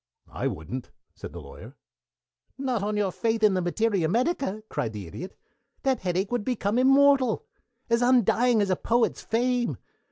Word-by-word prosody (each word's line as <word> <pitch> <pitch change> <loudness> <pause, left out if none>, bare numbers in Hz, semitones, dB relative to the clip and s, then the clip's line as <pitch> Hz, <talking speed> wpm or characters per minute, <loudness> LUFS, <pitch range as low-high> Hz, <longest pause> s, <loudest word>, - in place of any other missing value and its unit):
"I - - -2
wouldn't," - - -5 0.2
said - - -9
the - - -8
Lawyer. - - -12 0.8
"Not 260 -5 -1
on 210 +1 -1
your 200 -2 +1
faith 225 +2 -1
in 210 -2 +5
the 185 - +1
Materia 185 -1 0
Medica!" 235 - 0
cried 110 - -3
the 105 -3 -6
Idiot. 170 - -8 0.5
"That 265 -1 +1
headache 185 +3 -1
would 245 -3 -1
become 225 -1 0
immortal. 270 - +4 0.4
As 235 0 +2
undying 245 -2 +4
as 195 - -1
a - - +3
poet's 235 +5 0
fame. 245 +1 0
225 Hz, 160 wpm, -26 LUFS, 195-250 Hz, 0.8 s, in